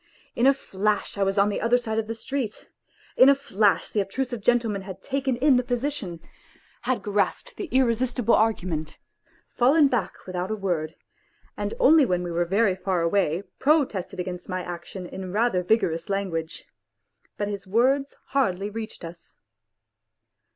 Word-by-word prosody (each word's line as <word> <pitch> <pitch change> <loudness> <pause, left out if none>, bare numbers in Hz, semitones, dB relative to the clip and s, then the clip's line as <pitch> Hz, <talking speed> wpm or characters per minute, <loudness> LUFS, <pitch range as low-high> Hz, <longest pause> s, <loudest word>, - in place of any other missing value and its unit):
In 240 - +3
a 275 - +7
flash 210 -4 -2
I 200 - -4
was 195 +1 +1
on 200 +1 +4
the 205 - -2
other 235 +2 +3
side 225 -3 -2
of 220 - -3
the 225 - -4
street; 240 -2 -4 0.5
in 260 - +7
a 280 - +6
flash 210 -7 +1
the 215 - 0
obtrusive 240 +4 -3
gentleman 230 -3 +1
had 190 0 -9
taken 270 -2 -1
in 270 0 +4
the 250 - +1
position, 245 - -3 0.7
had 255 - 0
grasped 210 - -1
the - - -4
irresistible 245 -2 +2
argument, 180 -8 0 0.5
fallen 280 +5 +4
back 230 -8 -1
without 185 0 -3
a 215 - -1
word, 170 -6 -2 0.6
and - - -3
only 325 -11 +6
when 180 -7 0
we 175 - -4
were 170 +1 0
very 195 +2 +2
far 185 -2 -1
away 175 0 +1 0.2
protested 270 - +1
against 180 0 -5
my 185 -1 -2
action 175 +1 -7
in 185 +1 -7
rather 215 -2 +1
vigorous 175 -4 0
language. 175 -5 -3 0.7
But 205 - -1
his 200 -1 -5
words 265 +7 +2
hardly 205 -7 0
reached 220 -4 -7
us. 170 0 -12
210 Hz, 160 wpm, -25 LUFS, 185-245 Hz, 0.7 s, a